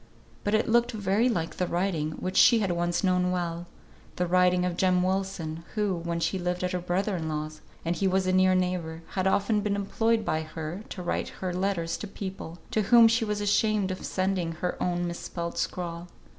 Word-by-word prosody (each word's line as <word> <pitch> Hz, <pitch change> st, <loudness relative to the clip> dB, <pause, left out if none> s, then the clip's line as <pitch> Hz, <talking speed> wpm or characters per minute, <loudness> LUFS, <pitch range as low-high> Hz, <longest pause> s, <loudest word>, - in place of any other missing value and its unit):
But 205 Hz, +1 st, +1 dB
it 215 Hz, -, +1 dB
looked 240 Hz, +1 st, +3 dB
very 210 Hz, +3 st, +2 dB
like 165 Hz, -8 st, -2 dB
the 180 Hz, -, 0 dB
writing 170 Hz, -4 st, -1 dB
which 185 Hz, +3 st, -4 dB
she 235 Hz, -, +7 dB
had 200 Hz, -4 st, 0 dB
once 175 Hz, +1 st, 0 dB
known 180 Hz, -1 st, +2 dB
well 175 Hz, -1 st, -2 dB, 0.5 s
the 180 Hz, -, 0 dB
writing 180 Hz, 0 st, +3 dB
of 180 Hz, -1 st, -1 dB
Jem 180 Hz, 0 st, +2 dB
Wilson, 185 Hz, -4 st, -2 dB
who, 210 Hz, -3 st, +1 dB
when 170 Hz, 0 st, -3 dB
she 170 Hz, +3 st, 0 dB
lived 180 Hz, 0 st, -2 dB
at 180 Hz, -, 0 dB
her 180 Hz, -, -1 dB
brother 185 Hz, +3 st, -1 dB
in 160 Hz, -1 st, -3 dB
law's, 155 Hz, 0 st, -4 dB, 0.2 s
and 170 Hz, +1 st, 0 dB
he 195 Hz, +3 st, +1 dB
was 190 Hz, 0 st, +2 dB
a 185 Hz, -, +1 dB
near 185 Hz, 0 st, +4 dB
neighbour, 175 Hz, -3 st, -1 dB
had 190 Hz, 0 st, -1 dB
often 205 Hz, +2 st, +2 dB
been 205 Hz, -1 st, 0 dB
employed 220 Hz, +2 st, 0 dB
by 155 Hz, -4 st, 0 dB
her 160 Hz, +3 st, -6 dB
to 185 Hz, -, -6 dB
write 175 Hz, -, -1 dB
her 185 Hz, -1 st, -4 dB
letters 180 Hz, -3 st, -1 dB
to 210 Hz, -, -6 dB
people, 190 Hz, -4 st, -7 dB
to 215 Hz, -, +2 dB
whom 235 Hz, -1 st, +8 dB
she 230 Hz, +1 st, +2 dB
was 210 Hz, -1 st, -2 dB
ashamed 205 Hz, -1 st, +2 dB
of 185 Hz, -, -6 dB
sending 185 Hz, -3 st, -1 dB
her 180 Hz, +2 st, -3 dB
own 175 Hz, 0 st, 0 dB
misspelt 170 Hz, 0 st, -4 dB
scrawl. 170 Hz, -1 st, -3 dB
185 Hz, 205 wpm, -27 LUFS, 170-200 Hz, 0.5 s, whom